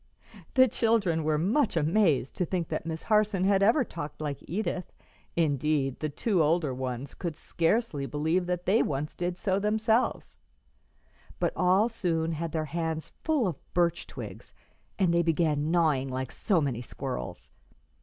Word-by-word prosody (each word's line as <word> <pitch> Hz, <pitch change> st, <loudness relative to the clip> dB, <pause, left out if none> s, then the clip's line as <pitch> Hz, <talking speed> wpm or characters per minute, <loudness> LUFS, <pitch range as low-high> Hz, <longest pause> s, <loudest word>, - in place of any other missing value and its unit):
'" -, -, -19 dB
The 260 Hz, 0 st, +7 dB
children 210 Hz, -9 st, +1 dB
were 155 Hz, 0 st, +1 dB
much 205 Hz, -, +1 dB
amazed 160 Hz, -, +2 dB
to -, -, +1 dB
think 175 Hz, -1 st, -2 dB
that -, -, -3 dB
Miss 160 Hz, -1 st, -4 dB
Harson 210 Hz, -3 st, +2 dB
had 195 Hz, 0 st, +3 dB
ever 230 Hz, +8 st, +4 dB
talked 150 Hz, -9 st, -7 dB
like 145 Hz, -3 st, -3 dB
Edith 180 Hz, -1 st, -3 dB, 0.4 s
indeed, 145 Hz, -3 st, +1 dB
the 155 Hz, -, -2 dB
two 185 Hz, +5 st, +1 dB
older 155 Hz, -2 st, +2 dB
ones 130 Hz, +1 st, -4 dB
could 170 Hz, -4 st, -4 dB
scarcely 165 Hz, -, 0 dB
believe 160 Hz, +5 st, 0 dB
that 180 Hz, 0 st, -2 dB
they 210 Hz, +5 st, +4 dB
once 145 Hz, +1 st, -2 dB
did 175 Hz, 0 st, -3 dB
so 190 Hz, +1 st, 0 dB
themselves; 220 Hz, +3 st, 0 dB, 1.0 s
but -, -, +1 dB
all 185 Hz, +4 st, +4 dB
soon 165 Hz, -8 st, -1 dB
had 165 Hz, 0 st, -3 dB
their 160 Hz, -1 st, -1 dB
hands 160 Hz, 0 st, -3 dB
full 310 Hz, -7 st, +2 dB
of 175 Hz, -7 st, -5 dB
birch 170 Hz, -1 st, +1 dB
twigs, -, -, -9 dB, 0.4 s
and 185 Hz, -4 st, +2 dB
they 170 Hz, -, +4 dB
began 155 Hz, -2 st, +1 dB
gnawing 155 Hz, -6 st, +2 dB
like 130 Hz, 0 st, -3 dB
so 190 Hz, -5 st, +1 dB
many 135 Hz, -6 st, -1 dB
squirrels. 60 Hz, -, -6 dB
170 Hz, 160 wpm, -28 LUFS, 150-195 Hz, 1.0 s, The